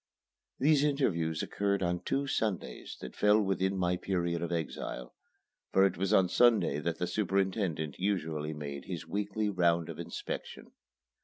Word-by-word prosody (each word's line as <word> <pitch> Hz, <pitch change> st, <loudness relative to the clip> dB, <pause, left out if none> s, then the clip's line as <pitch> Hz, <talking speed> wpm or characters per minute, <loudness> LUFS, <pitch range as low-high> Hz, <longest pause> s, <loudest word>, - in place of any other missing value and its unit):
These 145 Hz, +1 st, +4 dB
interviews 85 Hz, -, +1 dB
occurred 100 Hz, -1 st, 0 dB
on 90 Hz, 0 st, 0 dB
two 140 Hz, +9 st, -1 dB
Sundays 110 Hz, -7 st, -2 dB
that 65 Hz, -, -8 dB
fell 105 Hz, +1 st, +4 dB
within 95 Hz, -1 st, 0 dB
my 90 Hz, -1 st, +1 dB
period 85 Hz, -3 st, -1 dB
of 85 Hz, 0 st, -3 dB
exile, 80 Hz, -6 st, -4 dB, 0.6 s
for 95 Hz, -, +5 dB
it 95 Hz, -, +1 dB
was 95 Hz, +3 st, -1 dB
on 95 Hz, -3 st, +5 dB
Sunday 110 Hz, -, +4 dB
that 85 Hz, +2 st, -2 dB
the 90 Hz, -, -1 dB
superintendent 95 Hz, -5 st, -1 dB
usually 80 Hz, -6 st, -1 dB
made 70 Hz, -2 st, -6 dB
his -, -, -5 dB
weekly 105 Hz, +1 st, -1 dB
round 85 Hz, -4 st, +2 dB
of -, -, -7 dB
inspection. -, -, -6 dB
95 Hz, 150 wpm, -31 LUFS, 85-100 Hz, 0.6 s, for